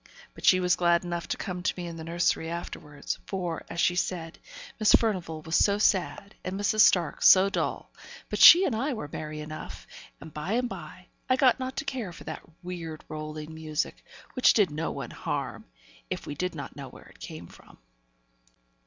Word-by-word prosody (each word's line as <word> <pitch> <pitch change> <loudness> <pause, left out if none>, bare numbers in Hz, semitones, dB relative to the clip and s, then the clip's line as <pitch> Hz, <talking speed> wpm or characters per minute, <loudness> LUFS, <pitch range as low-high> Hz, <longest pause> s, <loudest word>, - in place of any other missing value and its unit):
But - - -14
she 185 - +6
was 180 0 +3
glad 170 -1 +3
enough 175 -1 -4
to - - -2
come 180 -1 -5
to 185 - 0
me 180 - -4
in 170 -1 -6
the 160 - -7
nursery 165 0 0
afterwards; 150 -4 -6
for, 175 -4 -3
as 165 - -5
she 175 - +3
said, 170 -2 -3 0.4
Miss 215 - +5
Furnivall 180 -8 -1
was 160 +1 -2
so 200 0 +4
sad, 200 0 0
and 185 +2 -4
Mrs. 205 +1 0
Stark 175 -6 +4
so 195 +1 +7
dull; - - -2 0.4
but - - -4
she 360 +3 +10
and 240 - 0
I 270 +6 -1
were 180 - -5
merry 155 0 -5
enough; 155 0 -8 0.3
and 155 +1 -11
by 155 +7 -3
and 245 +1 +1
by, 180 -3 -9 0.2
I 255 - +5
got 260 -1 +4
not 260 0 -5
to - - -3
care 255 -9 -4
for 170 - -12
that - - -6 0.2
weird 170 -3 -7
rolling 155 0 -6
music, 155 -1 -3 0.3
which 255 - +5
did 205 -4 +3
one 155 +2 -4
no - - -12
harm, - - -4 0.4
if - - -4
we - - -5
did 180 +4 -3
not 140 -4 -7
know 135 -2 -8
where - - -15
it - - -18
came 80 +2 -8
from. - - -17
175 Hz, 195 wpm, -27 LUFS, 155-200 Hz, 0.4 s, she